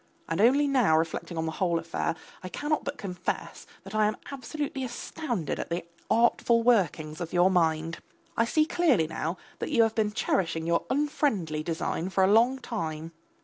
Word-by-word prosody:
And 165 Hz, +3 st, 0 dB
only 275 Hz, +6 st, +5 dB
now 245 Hz, -, +4 dB
reflecting 165 Hz, +1 st, -2 dB
on 160 Hz, -, -1 dB
the 160 Hz, -, -2 dB
whole 170 Hz, 0 st, 0 dB
affair, 165 Hz, 0 st, -2 dB, 0.3 s
I 185 Hz, -, -6 dB
cannot 295 Hz, +8 st, -1 dB
but 280 Hz, +1 st, -4 dB
confess 180 Hz, -3 st, -4 dB, 0.2 s
that 195 Hz, +2 st, -10 dB
I 215 Hz, -1 st, +3 dB
am 215 Hz, -, -2 dB
absolutely 275 Hz, 0 st, -4 dB
astounded 240 Hz, -, -3 dB
at -, -, -4 dB
the 170 Hz, 0 st, -2 dB, 0.2 s
artful 235 Hz, 0 st, +3 dB
workings 170 Hz, -9 st, +2 dB
of 170 Hz, 0 st, -5 dB
your 180 Hz, +1 st, +4 dB
mind. 165 Hz, -2 st, +1 dB, 0.4 s
I 230 Hz, -, +3 dB
see 310 Hz, +6 st, +2 dB
clearly 305 Hz, -, +3 dB
now 165 Hz, +2 st, -3 dB, 0.2 s
that -, -, -3 dB
you 230 Hz, -, +4 dB
have 225 Hz, -1 st, +1 dB
been 215 Hz, -2 st, +1 dB
cherishing 165 Hz, -6 st, 0 dB
your 170 Hz, 0 st, +1 dB
unfriendly 260 Hz, -, 0 dB
design 165 Hz, +2 st, -2 dB
for 190 Hz, 0 st, +2 dB
a 190 Hz, -, +4 dB
long 240 Hz, +4 st, +5 dB
time. 165 Hz, -10 st, -4 dB
195 Hz, 180 wpm, -28 LUFS, 165-245 Hz, 0.4 s, only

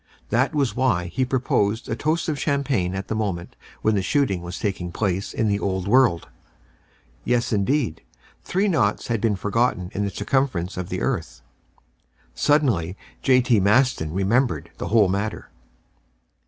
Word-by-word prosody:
That 130 Hz, +8 st, +1 dB
was 135 Hz, -8 st, +1 dB
why 120 Hz, -9 st, +1 dB
he 130 Hz, 0 st, +1 dB
proposed 115 Hz, -4 st, 0 dB
a 110 Hz, -, -2 dB
toast 155 Hz, +6 st, -1 dB
in 155 Hz, -, +1 dB
champagne 140 Hz, -, 0 dB
at 95 Hz, 0 st, -4 dB
the -, -, -2 dB
moment 100 Hz, -6 st, -3 dB, 0.3 s
when 110 Hz, -, +3 dB
the 100 Hz, -, +1 dB
shooting 100 Hz, -4 st, +1 dB
was 85 Hz, +1 st, -6 dB
taking 95 Hz, -4 st, -3 dB
place 95 Hz, +1 st, -1 dB
in 110 Hz, -, 0 dB
the 100 Hz, -1 st, +1 dB
Old 95 Hz, -2 st, -2 dB
World. 120 Hz, -7 st, +3 dB, 1.0 s
Yes, 120 Hz, 0 st, 0 dB
indeed, 110 Hz, -, 0 dB, 0.4 s
three 195 Hz, +3 st, 0 dB
naughts 115 Hz, -, +1 dB
had 115 Hz, -3 st, 0 dB
been 110 Hz, -3 st, +2 dB
forgotten 105 Hz, -2 st, 0 dB
in 100 Hz, -, -1 dB
the 100 Hz, -, -1 dB
circumference 100 Hz, -4 st, -1 dB
of 90 Hz, -1 st, -5 dB
the -, -, -3 dB
earth. -, -, -3 dB, 0.9 s
Suddenly 100 Hz, -, +1 dB, 0.2 s
J.T. 125 Hz, -4 st, +4 dB
Maston 105 Hz, -, +2 dB
remembered 105 Hz, +8 st, 0 dB
the -, -, -3 dB
whole 110 Hz, -3 st, +4 dB
matter. 100 Hz, +3 st, -3 dB
110 Hz, 155 wpm, -23 LUFS, 95-130 Hz, 1.0 s, J.T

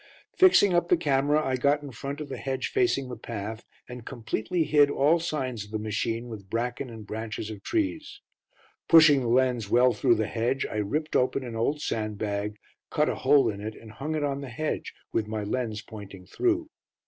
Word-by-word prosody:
Fixing 355 Hz, -, +6 dB
up 175 Hz, 0 st, +2 dB
the 180 Hz, -, +5 dB
camera, 145 Hz, 0 st, +2 dB
I 130 Hz, -1 st, 0 dB
got 145 Hz, +3 st, +2 dB
in 140 Hz, -, -7 dB
front 140 Hz, +4 st, -6 dB
of 150 Hz, -, -5 dB
the -, -, -6 dB
hedge 130 Hz, -1 st, -2 dB
facing 365 Hz, -, +1 dB
the 125 Hz, -, -6 dB
path, 110 Hz, 0 st, -6 dB, 0.2 s
and 125 Hz, -1 st, -8 dB
completely 120 Hz, +7 st, -2 dB
hid 145 Hz, -1 st, +4 dB
all 150 Hz, +4 st, +3 dB
signs 130 Hz, -, -3 dB
of 105 Hz, -, -14 dB
the 110 Hz, -, -2 dB
machine 115 Hz, +2 st, -2 dB
with 105 Hz, -5 st, -9 dB
bracken 125 Hz, +4 st, -2 dB
and 110 Hz, -2 st, -9 dB
branches 110 Hz, 0 st, -5 dB
of 105 Hz, -2 st, -8 dB
trees. 320 Hz, -1 st, -2 dB, 0.7 s
Pushing 155 Hz, -4 st, +7 dB
the 120 Hz, -, -2 dB
lens 120 Hz, -3 st, +2 dB
well 125 Hz, +2 st, +5 dB
through 115 Hz, +2 st, +3 dB
the 110 Hz, 0 st, 0 dB
hedge, 120 Hz, +5 st, -1 dB
I -, -, -5 dB
ripped 150 Hz, +10 st, -2 dB
open 130 Hz, +1 st, +2 dB
an 120 Hz, -2 st, -6 dB
old 140 Hz, +7 st, 0 dB
sandbag, 105 Hz, -1 st, -2 dB, 0.3 s
cut -, -, +1 dB
a -, -, -1 dB
hole 145 Hz, -2 st, +4 dB
in 100 Hz, -2 st, -3 dB
it 110 Hz, +1 st, -5 dB
and 110 Hz, -1 st, -12 dB
hung 150 Hz, +7 st, -4 dB
it 150 Hz, -, -1 dB
on 140 Hz, -1 st, -1 dB
the 140 Hz, -, -7 dB
hedge, 155 Hz, +7 st, -3 dB, 0.2 s
with 110 Hz, -2 st, 0 dB
my 110 Hz, -1 st, -3 dB
lens 110 Hz, 0 st, -3 dB
pointing 100 Hz, -4 st, -10 dB
through. 335 Hz, -, 0 dB
125 Hz, 200 wpm, -27 LUFS, 110-145 Hz, 0.7 s, Pushing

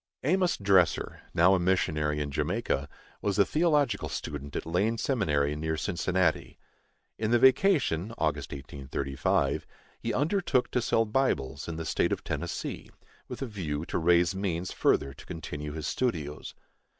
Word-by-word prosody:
Amos 180 Hz, +5 st, +2 dB
Dresser, 95 Hz, -4 st, +2 dB
now 85 Hz, +3 st, +5 dB
a 95 Hz, -, +3 dB
missionary 75 Hz, -5 st, +1 dB
in 70 Hz, -1 st, -3 dB
Jamaica, 70 Hz, 0 st, -1 dB, 0.3 s
was 100 Hz, -1 st, 0 dB
a 100 Hz, -, +5 dB
theological 150 Hz, -, +1 dB
student 70 Hz, -1 st, -5 dB
at -, -, -3 dB
Lane 100 Hz, +8 st, +1 dB
Seminary, 75 Hz, -, +1 dB
near 80 Hz, +1 st, -2 dB
Cincinnati. 90 Hz, -1 st, 0 dB, 0.6 s
In 110 Hz, -, 0 dB
the 120 Hz, -, +5 dB
vacation 130 Hz, -, +3 dB
(August -, -, -1 dB
1835) 70 Hz, -1 st, -2 dB, 0.3 s
he -, -, -2 dB
undertook 150 Hz, -3 st, +1 dB
to 125 Hz, -, +1 dB
sell 115 Hz, -1 st, +2 dB
Bibles 75 Hz, -, 0 dB
in 85 Hz, -, -4 dB
the 80 Hz, 0 st, -5 dB
State -, -, +1 dB
of -, -, -2 dB
Tennessee, -, -, -4 dB, 0.4 s
with -, -, -5 dB
a -, -, -1 dB
view 85 Hz, -, -4 dB
to -, -, -2 dB
raise 85 Hz, 0 st, +4 dB
means 95 Hz, -2 st, -2 dB
further 70 Hz, -, +1 dB
to -, -, -14 dB
continue 75 Hz, -3 st, -6 dB
his 80 Hz, -1 st, -5 dB
studios. 80 Hz, -, -2 dB
90 Hz, 150 wpm, -29 LUFS, 75-115 Hz, 0.6 s, now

